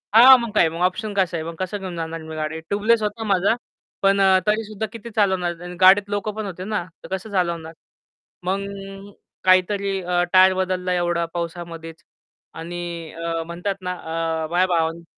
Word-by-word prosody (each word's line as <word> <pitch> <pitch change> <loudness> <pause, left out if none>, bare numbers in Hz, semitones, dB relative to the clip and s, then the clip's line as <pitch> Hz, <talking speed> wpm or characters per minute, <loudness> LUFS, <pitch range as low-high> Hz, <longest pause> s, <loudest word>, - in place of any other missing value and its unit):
हां, 255 +3 +10
मग 235 -2 -4
काय, 165 -5 +5
मग 165 +2 -6
ऑप्शन 210 +3 -5
कसं 185 -3 +1
आहे, 160 - -4
मग 165 - -6
कसं 185 +2 -2
घेऊन 185 -2 -6
जाणार 165 0 -4
मी 160 - -7
गाडी 155 +1 -3
ट्यूबलेस 215 +3 +2
होता 220 +2 -2
माझा 195 +5 +2 0.5
पण 195 0 +3
अ, 190 -1 +5
तरी 215 +1 +2
सुद्धा 215 0 -4
किती 230 0 -9
चालवणार? 180 -4 +1
आणि 180 0 -7
गाडीत 195 +2 +6
लोक 205 0 -2
पण 215 -1 -4
होते 185 -1 -6
ना, 210 -3 -2 0.2
तर - - -9
कसं 205 +3 -8
चालवणार? 170 -3 -1 0.7
मग, 195 +2 -1 0.8
काहीतरी 195 +1 +3
अ, 175 0 +1
टायर 185 0 +7
बदलला 185 -1 -1
एवढा 175 -1 0
पावसामध्येच 170 -1 -6 0.5
आणि 175 +1 -6 0.3
अ, 165 0 -3
म्हणतात 175 +4 -3
ना 180 0 -3
अ, 160 -1 -3
माझ्या 180 +2 +3
भावानी 165 +1 -1
185 Hz, 180 wpm, -22 LUFS, 170-200 Hz, 0.8 s, हां